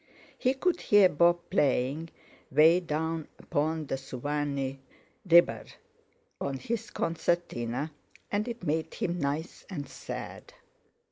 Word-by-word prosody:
He 255 +2 +1
could 355 +6 0
hear 205 -3 +6
Bob 175 +2 +3
playing: 145 -1 +1 0.4
"Way 165 +3 +6
down 160 -1 -2
upon 155 +2 -1
de 135 - -2
Suwannee 135 0 -3 0.5
ribber" 170 +1 +6 0.8
on 140 -1 -2
his 225 - -3
concertina, 155 -5 -1 0.4
and 210 +3 0
it 235 -4 -6
made 160 0 -1
him 175 0 -2
nice 145 +3 -3
and 145 -8 -5
sad. 135 - -8
160 Hz, 115 wpm, -29 LUFS, 140-175 Hz, 0.8 s, hear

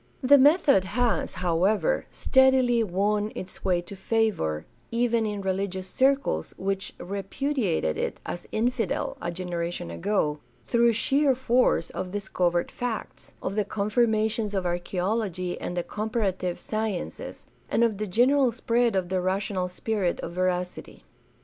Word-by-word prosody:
The 280 +2 +7
method 285 - +5
has, 235 +4 0
however, 195 - +2
steadily 260 -3 +4
won 205 +2 0
its 185 - -7
way 180 -2 +2
to 200 - -9
favor 190 - 0
— - - -36
even 230 -1 +1
in 205 -1 -3
religious 190 0 -2
circles 265 - +1
which 195 0 -3
repudiated 200 - -1
it - - -2
as 175 - -6
"infidel" 230 -2 -1
a 170 - -2
generation 175 - -4
ago 150 - 0
— - - -34
^through 235 -1 +3
sheer 275 +3 +3
force 245 -8 +2
of 185 - -4
discovered 175 -4 0
facts, 245 -3 -5
of 190 - -2
the 210 +1 +1
confirmations 215 +1 0
of 190 -2 -1
archaeology 180 +1 -2
and 180 - -4
the 175 - 0
comparative 200 -5 -2
sciences, 215 -4 -4 0.2
and 235 - +2
of 220 -4 +1
the 215 - -2
general 250 +6 +3
spread 235 -1 +1
of 185 -2 0
the 185 -1 0
rational 185 0 -1
spirit 185 0 -1
of - - -5
veracity. 180 0 -2
205 Hz, 140 wpm, -26 LUFS, 180-235 Hz, 0.2 s, The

